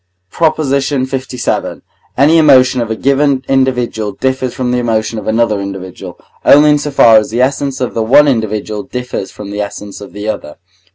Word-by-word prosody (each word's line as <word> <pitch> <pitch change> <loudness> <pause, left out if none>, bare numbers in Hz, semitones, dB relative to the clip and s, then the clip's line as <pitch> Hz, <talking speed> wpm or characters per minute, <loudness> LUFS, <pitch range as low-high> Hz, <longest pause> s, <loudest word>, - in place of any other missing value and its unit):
PROP. 160 -2 +1
LVII. 135 -3 -2 0.4
Any 150 +5 +4
emotion 130 -4 +4
of 115 - -3
a 110 - -2
given 140 +1 +1
individual 125 -6 0
differs 130 +3 -2
from 125 -1 -3
the 125 - 0
emotion 110 -2 -1
of 105 - -10
another 110 -2 +1
individual, 95 -2 -8 0.2
only 150 +1 +6
in 150 - +2
so 150 - -4
far 115 -5 +5
as 110 - +1
the 120 +3 +1
essence 140 0 -2
of 125 - -3
the 115 - -1
one 135 +7 +5
individual 110 -4 -2
differs 125 0 -5
from 100 -1 -10
the 105 0 -3
essence 100 0 -7
of 100 - -10
the 105 +1 -6
other. 75 -8 -5
125 Hz, 180 wpm, -13 LUFS, 110-135 Hz, 0.4 s, only